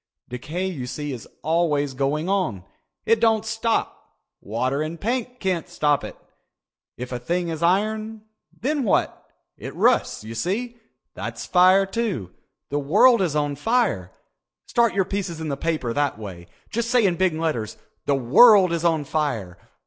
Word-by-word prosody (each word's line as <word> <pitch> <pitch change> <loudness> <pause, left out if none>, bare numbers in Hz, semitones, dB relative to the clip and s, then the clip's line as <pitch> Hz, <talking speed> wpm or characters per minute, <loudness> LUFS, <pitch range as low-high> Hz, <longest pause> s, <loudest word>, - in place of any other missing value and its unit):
Decay 150 +9 -4
you 150 -10 -4
see 145 +3 -5
is 120 - -8 0.2
always 150 -4 +1
going 140 +5 -1
on. 185 - -1 0.4
It 230 0 +3
doesn't 225 -1 +2
stop. 225 +1 -2 0.2
Water 125 +7 -1
and 160 +2 -4
paint 250 +2 -3
can't 185 -4 -2
stop 145 -2 +1
it. - - -8 0.8
If 125 +1 -6
a 125 - -3
thing 175 +7 -2
is 160 -1 -4
iron, 215 +5 0 0.3
then 290 +3 -2
what? 220 - 0 0.3
It - - -8
rusts, - - +2
you 110 +1 -7
see. 215 - -3 0.4
That's - - -6
fire, 185 +2 +5
too. 195 - -3 0.4
The 145 - 0
world 205 - +5
is 170 -5 0
on 145 -1 0
fire. 170 - 0 0.5
Start 235 -3 +2
your 195 -2 +2
pieces 185 -4 -4
in 160 -1 -4
the 140 - -1
paper 150 -6 -2
that 145 -4 0
way. 95 -5 -9 0.2
Just 235 +1 -2
say 245 -3 +3
in 180 -3 +2
big 185 -2 +1
letters 150 -10 -2 0.3
_'The 140 -1 +2
World 185 - +6
Is 170 -1 -2
On 165 -3 +2
Fire. 130 - -2
165 Hz, 160 wpm, -23 LUFS, 140-210 Hz, 0.8 s, World